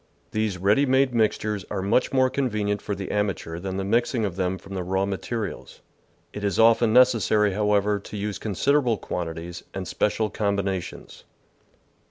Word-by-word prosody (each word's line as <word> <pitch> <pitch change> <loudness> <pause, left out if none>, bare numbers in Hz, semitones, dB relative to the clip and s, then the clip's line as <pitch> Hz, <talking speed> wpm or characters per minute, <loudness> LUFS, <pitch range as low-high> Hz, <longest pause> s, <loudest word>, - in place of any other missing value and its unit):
These 110 -3 -1
ready 105 +10 +3
made 130 0 +3
mixtures 110 -3 0
are 95 -2 -3
much 100 +6 +2
more 130 -1 +3
convenient 105 -6 -1
for 100 - -3
the 95 -1 -5
amateur 95 -5 -2
than 95 +1 -4
the 95 - -2
mixing 115 +2 +1
of 95 -4 -3
them 95 0 -1
from 95 +1 -11
the 95 - -2
raw 95 +2 0
materials. 105 +2 -5 0.5
It 105 - -6
is 100 -3 0
often 115 0 +5
neces 125 -1 +5
sary, 105 -1 +2
however, 105 0 +1
to 100 +1 -9
use 105 0 -3
considerable 120 +3 +1
quantities 85 -1 -5
and 95 -2 -4
special 105 +4 0
combinations. 100 -3 -3
105 Hz, 165 wpm, -25 LUFS, 95-115 Hz, 0.5 s, often